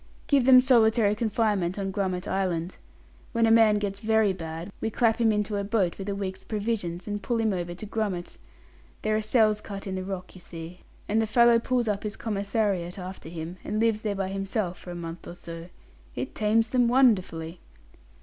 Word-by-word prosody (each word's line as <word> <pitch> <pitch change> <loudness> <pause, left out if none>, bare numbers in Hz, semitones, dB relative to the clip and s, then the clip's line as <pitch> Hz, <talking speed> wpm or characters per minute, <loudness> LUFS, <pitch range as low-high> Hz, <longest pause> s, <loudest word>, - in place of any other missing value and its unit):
"Give 275 -4 +3
them 255 -1 +8
solitary 225 -4 +4
confinement 210 -4 0
on 195 -1 -2
Grummet 185 -2 -2
Island. 185 -2 -1 0.6
When 230 -1 +3
a 225 - +4
man 225 -2 +6
gets 200 -1 -3
very 220 -2 +2
bad, 165 +1 -6
we 225 - 0
clap 225 0 +2
him 230 -2 +3
into 210 0 -1
a 200 - -1
boat 200 -4 0
with 195 +1 -4
a 200 - -1
week's 190 -1 -5
provisions 205 -5 -3
and 205 0 -3
pull 235 +1 -1
him 220 -2 +1
over 175 -1 -3
to 200 - -8
Grummet. 200 -5 -3 0.6
There 215 0 +1
are 215 - +1
cells 215 -1 +2
cut 200 -1 -7
in 190 - -4
the 185 0 -3
rock, 185 -1 -6
you 185 - -12
see, 170 +1 -9 0.3
and 220 +2 +2
the 220 - 0
fellow 235 +1 +5
pulls 245 0 0
up 205 -2 0
his 210 0 -4
commissariat 200 -4 -1
after 185 -3 -8
him, 165 +1 -6
and 215 - -2
lives 225 -1 +2
there 210 -2 -2
by 195 -1 -2
himself 195 -1 -2
for - - -11
a 175 - -5
month 165 0 -7
or 175 - -8
so. 165 -1 -9 0.5
It - - -4
tames 220 +1 +2
them 245 -2 +3
wonderfully." 185 -10 +2
205 Hz, 200 wpm, -27 LUFS, 180-220 Hz, 0.6 s, them